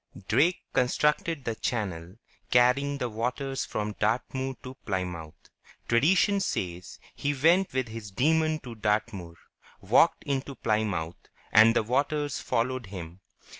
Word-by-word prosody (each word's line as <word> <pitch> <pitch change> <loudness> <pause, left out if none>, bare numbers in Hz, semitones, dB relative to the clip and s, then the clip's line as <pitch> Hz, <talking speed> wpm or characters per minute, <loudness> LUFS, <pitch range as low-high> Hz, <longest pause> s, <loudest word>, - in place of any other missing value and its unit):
Drake 145 - +2
constructed 150 +3 +1
the 115 - -1
channel, 95 -7 -3 0.3
carrying 130 +4 +3
the 125 - -2
waters 125 +4 -3
from 105 0 -3
Dartmoor 130 +4 -1
to 130 - -7
Plymouth. 90 -5 -5 0.4
Tradition 180 +11 +3
says 90 - -3 0.2
he 145 0 -2
went 170 +7 +3
with 130 -1 -1
his 110 -2 -8
demon 155 +9 +2
to 125 -3 -8
Dartmoor, 105 -5 -2 0.4
walked - - +3
into 140 0 -3
Plymouth, 105 -8 -2 0.2
and 115 +2 +7
the 115 - +3
waters 145 +4 0
followed 120 0 -1
him. 90 -2 -8
120 Hz, 125 wpm, -28 LUFS, 105-140 Hz, 0.4 s, and